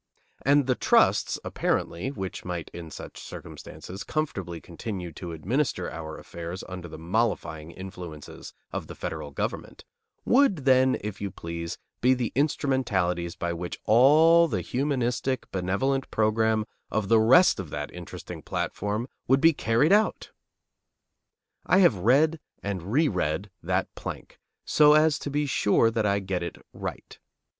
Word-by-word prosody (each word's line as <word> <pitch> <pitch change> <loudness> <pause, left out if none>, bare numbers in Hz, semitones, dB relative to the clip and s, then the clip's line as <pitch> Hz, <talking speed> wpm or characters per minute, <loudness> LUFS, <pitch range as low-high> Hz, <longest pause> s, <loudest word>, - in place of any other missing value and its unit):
And 140 0 +4
the 130 - +2
trusts, - - +3
apparently, 85 +9 -1
which 95 -9 -5
might, 90 -2 -5
in 85 -2 -8
such - - -9
circumstances, 95 +2 -9
comfortably 95 - -3
continue 90 0 -6
to 85 +2 -7
administer 90 - -1
our 80 -1 -7
affairs 85 +2 -7
under 90 -2 -7
the 80 - -9
mollifying 85 -4 -1
influences 90 -4 -9 0.2
of - - -4
the - - -9
federal 75 -2 -5
government, 70 - -5 0.4
would 235 - +3
then, 130 -1 +5
if 105 -1 -6
you 100 - -2
please, 85 -1 -6 0.2
be 130 +2 +5
the 125 -3 -2
instrumentalities 115 - 0
by 85 0 -2
which 85 +1 -5
all 155 +8 +6
the - - -2
humanistic, 130 -1 -1
benevolent 100 +9 0
program 110 0 +2 0.2
of 110 -2 -1
the 115 +2 +5
rest 130 - +6
of 90 -5 -5
that 75 0 -5
interesting 90 -1 -8
platform 105 +4 -3 0.2
would 135 +1 +4
be 165 +2 +6
carried 130 - +2
out! 215 +1 +2 1.4
I 185 - +5
have 180 -9 +6
read 140 - +3 0.2
and 100 -1 -4
reread 105 - +1
that - - -1
plank, - - -8 0.3
so 150 -1 +6
as 155 -1 +4
to - - -5
be 145 +1 0
sure 115 -3 +3
that 110 -2 0
I 100 0 +2
get 95 -2 -2
it 85 - -5 0.2
right. - - -7
110 Hz, 145 wpm, -27 LUFS, 90-135 Hz, 1.4 s, all